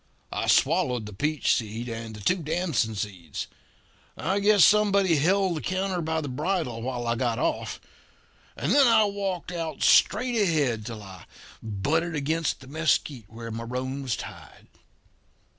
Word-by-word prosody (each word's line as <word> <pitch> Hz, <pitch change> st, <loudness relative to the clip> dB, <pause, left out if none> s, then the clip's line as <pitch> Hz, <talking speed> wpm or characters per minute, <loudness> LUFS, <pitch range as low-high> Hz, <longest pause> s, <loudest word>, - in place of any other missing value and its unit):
"I -, -, -2 dB
swallowed 125 Hz, -3 st, +2 dB
the 105 Hz, -, -9 dB
peach 150 Hz, +8 st, +1 dB
seed 115 Hz, +1 st, -3 dB
and 115 Hz, -1 st, -6 dB
the 105 Hz, -, -10 dB
two 180 Hz, -, +2 dB
damson 160 Hz, -9 st, -1 dB
seeds. 95 Hz, -7 st, -5 dB, 0.7 s
I 190 Hz, +3 st, 0 dB
guess 205 Hz, -2 st, +6 dB
somebody 200 Hz, -5 st, +4 dB
held 185 Hz, +4 st, +2 dB
the -, -, -4 dB
counter 185 Hz, -1 st, -1 dB
by 160 Hz, 0 st, -1 dB
the 145 Hz, -, -5 dB
bridle 145 Hz, -3 st, -2 dB
while 120 Hz, 0 st, -3 dB
I 115 Hz, -, +1 dB
got 120 Hz, -1 st, -1 dB
off; -, -, -2 dB, 0.8 s
and -, -, -1 dB
then 280 Hz, -2 st, +6 dB
I 230 Hz, -2 st, +6 dB
walked 195 Hz, -4 st, -3 dB
out 165 Hz, -4 st, -4 dB
straight 250 Hz, -2 st, +4 dB
ahead 140 Hz, -, +1 dB
till 110 Hz, -3 st, -7 dB
I 95 Hz, -3 st, -12 dB, 0.4 s
butted 150 Hz, -, -1 dB
against 155 Hz, +2 st, -1 dB
the 130 Hz, -, -13 dB
mesquite 150 Hz, -5 st, 0 dB
where 115 Hz, +1 st, -8 dB
my 115 Hz, +1 st, -5 dB
roan 130 Hz, +3 st, -4 dB
was 130 Hz, -5 st, -1 dB
tied. -, -, -11 dB
145 Hz, 160 wpm, -26 LUFS, 115-180 Hz, 0.8 s, guess